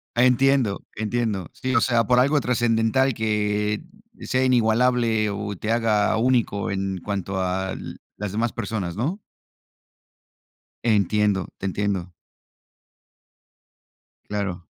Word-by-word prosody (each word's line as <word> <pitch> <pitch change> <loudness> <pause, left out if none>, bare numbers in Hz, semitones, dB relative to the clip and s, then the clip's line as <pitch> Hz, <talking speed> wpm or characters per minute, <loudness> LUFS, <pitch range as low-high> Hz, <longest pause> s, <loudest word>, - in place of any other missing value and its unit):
Entiendo, 125 -3 +3
entiendo. 110 -4 -2
Sí, 130 0 -2
o 115 - +5
sea, 120 -3 +2
por 125 +3 +4
algo 140 +3 +3
trascendental, 120 +2 +2
que 105 0 0 0.4
sea 130 0 0
inigualable, 115 -2 +2
o 100 0 -4
te 110 +5 -3
haga 110 -2 +2
único, 115 -4 +1
en 95 -1 -2
cuanto 95 -1 -3
al 95 +1 -3 0.2
las 105 -2 -4
demás 115 +2 0
personas, 100 -6 -4
¿no? 160 - -2 1.6
Entiendo. 105 -2 +2
Te - - -4
entiendo. 95 -2 -2 2.2
Claro. 95 -4 -3
110 Hz, 105 wpm, -23 LUFS, 100-120 Hz, 2.2 s, o